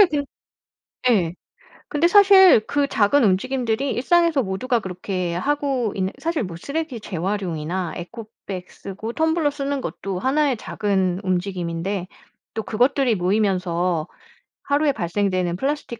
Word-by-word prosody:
사실 405 - +9
그 290 -2 -1 0.9
예. 180 -7 +2 0.5
근데 300 +3 +2
사실 385 - +7
그 285 -1 +1
작은 245 +2 +3
움직임들이 245 +5 0
일상에서 330 +2 +2
모두가 230 +5 -1
그렇게 180 -2 -4
하고 270 0 -1
있는 190 0 -1
사실 325 -6 -1
뭐 170 -3 -7
쓰레기 280 - -4
재활용이나 180 -3 -3
에코백 195 -1 -8
쓰고 210 +4 -7
텀블러 320 +1 +1
쓰는 280 -1 -3
것도 195 -6 -4
1 285 +2 +2
의 250 - 0
작은 190 -4 -1
움직임인데 180 0 -2 0.5
또 220 - -2
그것들이 245 +2 +2
모이면서 180 -3 0 0.6
하루에 290 +1 +2
발생되는 185 -4 -1
플라스틱 270 +1 -3
215 Hz, 305 characters per minute, -22 LUFS, 185-280 Hz, 0.9 s, 사실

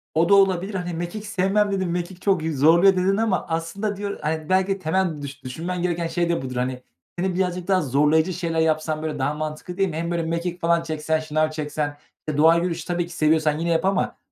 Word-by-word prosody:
O 165 +2 +3
da 200 - +7
olabilir. 195 0 +3
Hani, 180 -2 -3
"Mekik 175 +6 -5
sevmem." 205 +1 +1
dedin. 190 -2 -1
"Mekik 175 +1 -4
çok 190 -5 +1
yü 160 -3 -2
zorluyor." 170 +7 +6
dedin 190 +2 +2
ama 220 -4 0
aslında 170 +6 -2
diyo 200 0 -3
hani, 155 +1 -3
belki 190 0 +3
de 195 - -1
temel 170 -2 0
düşün 140 -1 -7
düşünmen 170 +8 -4
gereken 170 -1 -1
şey 170 +1 -1
de 170 - 0
budur, 130 -1 -6
hani. 125 +1 -2 0.4
Seni 185 0 0
birazcık 180 -1 -1
daha 190 -2 +3
zorlayıcı 150 +5 +2
şeyler 165 -1 -2
yapsan 155 -1 0
böyle 155 -2 -3
daha 135 +3 0
mantıklı 155 +3 -5
değil 195 -1 +2
mi? 155 - -6
Hem 170 +1 -2
böyle 170 -1 0
mekik 170 +2 -3
falan 170 0 +2
çeksen, 160 -1 -1
şınav 155 0 0
çeksen? 150 -1 -3 0.3
E, 150 -1 -2
doğa 160 +2 +6
yürüyüşü 170 -1 -1
tabii 175 -1 -1
ki - - -10
seviyorsan 155 -1 +2
yine 170 +1 -1
yap 165 +1 +1
ama 195 -1 0
170 Hz, 220 wpm, -23 LUFS, 155-185 Hz, 0.4 s, da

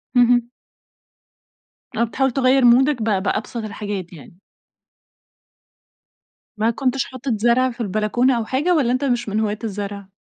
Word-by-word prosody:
اهم. 240 -1 +4 1.5
آه، - - +2
بتحاول 265 +3 0
تغير 260 0 +3
مودَك 255 +2 +4
ب 210 -4 0
بأبسط 215 +3 -2
الحاجات 205 -4 -6
يعني؟ 165 +2 -14 2.2
ما 220 +2 +1
كنتش 260 +2 -1
حاطط 260 +1 -5
زرع 240 +4 +2
في 240 0 -9
البلكونة 220 +5 +1
أو 230 - -2
حاجة، 295 +10 +1
والّا 265 -7 +2
أنتَ 255 +3 -1
مش 240 -4 -1
من 210 +2 -1
هواة 215 -1 -1
الزرع؟ 200 -2 -5
235 Hz, 135 wpm, -20 LUFS, 210-255 Hz, 2.2 s, اهم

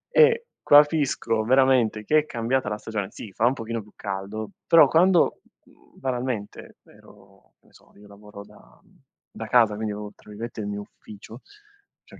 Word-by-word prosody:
E 470 0 +5 0.2
capisco 145 -7 +3
veramente 125 -3 +2
che 155 +6 +4
è 150 - -3
cambiata 120 -2 -2
la 105 - -3
stagione 105 -3 -5
sì, 105 - -10
fa 110 - 0
un 125 - +2
pochino 115 -2 -5
più 105 - -18
caldo, 100 +2 -6 0.2
però 165 - +7
quando, 175 +1 +3 0.2
mhmm, - - -24
banalmente, 125 -5 -5
ero 100 -1 -21
che - - -38
ne - - -27
so, - - -22
io 105 0 -17
lavoro 100 0 -13
da - - -21 0.6
da - - -7
casa, 115 -4 +4
quindi 110 0 -4
ho, 105 0 -7
tra - - -20
virgolette, 110 +2 -7
"il 100 - -5
mio 105 0 -5
ufficio", 105 +3 -14 0.6
cioè, - - -16
110 Hz, 170 wpm, -24 LUFS, 105-130 Hz, 0.6 s, però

